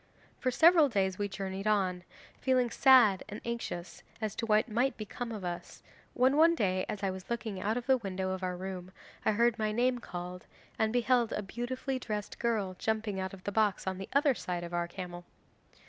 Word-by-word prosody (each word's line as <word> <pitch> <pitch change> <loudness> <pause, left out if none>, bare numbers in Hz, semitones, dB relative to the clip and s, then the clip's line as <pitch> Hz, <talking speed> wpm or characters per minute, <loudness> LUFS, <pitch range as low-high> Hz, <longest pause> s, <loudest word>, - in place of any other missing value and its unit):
'For 255 - +1
several 320 +3 +6
days 190 -4 0
we 205 - 0
journeyed 195 0 -4
on, 185 -4 +1 0.4
feeling 255 -3 +2
sad 250 -8 +6
and 210 - -6
anxious 230 -7 -5 0.2
as 215 -3 -2
to 230 - -2
what 215 +1 +3
might 245 +4 0
become 230 +2 -5
of 210 -4 -5
us, 175 -1 -6 0.3
when 260 +2 +4
one 330 +2 +6
day 185 - 0
as 205 -1 -4
I 195 - +1
was 185 0 -9
looking 220 -5 -3
out 220 +3 0
of 245 - -4
the 265 0 +4
window 190 -4 -3
of 190 0 -3
our 180 -1 -2
room, 185 -1 -6 0.3
I - - +4
heard 235 +1 +2
my 215 -1 +1
name 245 +3 +1
called, 180 -3 -7 0.3
and 220 0 +2
beheld 245 -1 +2
a 210 - -2
beautifully 255 +5 -3
dressed 210 -4 -5
girl 215 -6 0
jumping 220 -3 -1
out 190 +1 -4
of 185 - -17
the 205 - -3
box 210 -1 +1
on 190 -1 -2
the 195 - -7
other 280 0 +4
side 180 -6 -4
of 175 0 -7
our 175 0 0
camel. 175 -1 -7
210 Hz, 205 wpm, -31 LUFS, 190-240 Hz, 0.4 s, several